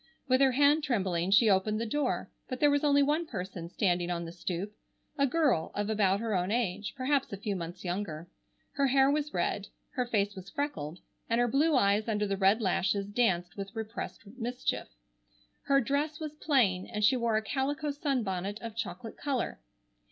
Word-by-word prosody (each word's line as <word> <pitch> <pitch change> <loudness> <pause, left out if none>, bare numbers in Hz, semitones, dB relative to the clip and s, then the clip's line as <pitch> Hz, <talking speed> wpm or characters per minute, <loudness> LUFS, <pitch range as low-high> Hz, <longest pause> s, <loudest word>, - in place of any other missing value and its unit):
With 255 +1 +3
her 265 -2 +5
hand 290 +3 +4
trembling 190 - 0
she 205 +3 +6
opened 210 +2 +2
the 230 - -1
door, 290 +6 -1 0.2
but 255 -2 -4
there 295 -1 +5
was 285 0 +2
only 285 -1 +5
one 305 +4 +1
person 180 - -6
standing 175 -2 0
on 170 -1 -2
the 165 - -7
stoop, 180 +3 -4 0.4
a 280 -2 +3
girl 280 - +1
of 205 +1 -1
about 200 -2 +2
her 225 -2 -1
own 180 -1 0
age, 210 -2 -1
perhaps 270 +1 +1
a 200 - -4
few 205 0 -3
months 175 +1 -6
younger. 175 -3 -3 0.4
Her 280 -1 +1
hair 270 +1 +4
was 300 0 -1
red, 195 +3 -1 0.2
her 250 -2 -1
face 205 -3 +1
was 190 0 -9
freckled, 175 - -3 0.3
and 230 +1 +2
her 245 - +3
blue 295 +5 +3
eyes 205 -2 +3
under 210 -2 0
the 200 -1 -1
red 195 +4 +3
lashes 195 0 +1
danced 190 -5 0
with 195 +1 -7
repressed 225 +1 -6
mischief. 245 +3 -3 0.8
Her 275 0 +4
dress 285 +4 -1
was 305 -2 -5
plain 245 - +2
and 210 0 -3
she 260 - +5
wore 235 -3 +1
a 220 - -1
calico 285 +5 -1
sunbonnet 215 - -2
of 230 -1 -7
chocolate 230 0 -5
color. 270 - -2
220 Hz, 190 wpm, -30 LUFS, 195-275 Hz, 0.8 s, she